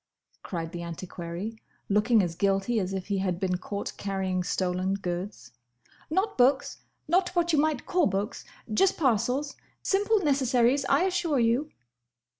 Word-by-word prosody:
cried 165 -3 -5
the 175 - -6
antiquary, 170 +4 -6 0.3
looking 210 +1 +3
as 170 -2 -2
guilty 195 +5 +1
as 185 -1 -2
if 190 -1 -3
he 200 -2 -1
had 185 -2 -1
been 185 -2 0
caught 200 +2 -5
carrying 190 -2 -1
stolen 185 +1 0
goods. 180 - -5 0.6
"Not 380 +1 0
books. 265 +2 +3 0.3
Not 360 +3 +3
what 345 -1 +2
you 300 - +4
might 305 -3 +1
call 360 -3 +2
books. 200 +3 -2 0.3
Just 385 - +3
parcels. 265 +1 +1 0.3
Simple 410 +3 +2
necessaries, 265 - +2
I 345 - +3
assure 350 -5 +1
you." 240 +6 +1
220 Hz, 145 wpm, -27 LUFS, 185-290 Hz, 0.6 s, you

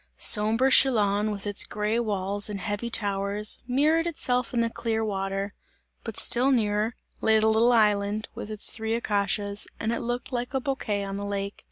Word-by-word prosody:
Sombre 225 +5 +4
Chillon, 210 -6 +4
with 205 -1 -5
its 205 -1 +2
grey 210 +2 -2
walls 205 -2 0
and 205 -1 -4
heavy 205 +3 -3
towers, 205 -1 0
mirrored 305 +6 +2
itself 250 -7 0
in 240 - -1
the 230 - 0
clear 225 -1 -2
water; 195 0 -3 0.5
but - - -6
still 255 +3 +4
nearer 215 -3 0 0.3
lay 220 0 +3
the 215 - +2
little 225 +2 +3
island, 210 -1 +1
with - - -8
its 215 -1 +1
three 220 0 -3
acacias, 205 -2 -1
and 225 - -2
it 235 - -2
looked 240 +2 -4
like 245 +2 -4
a - - +2
bouquet 245 -7 -3
on 195 0 -5
the 200 - -5
lake. 200 0 -4
215 Hz, 180 wpm, -26 LUFS, 205-235 Hz, 0.5 s, Sombre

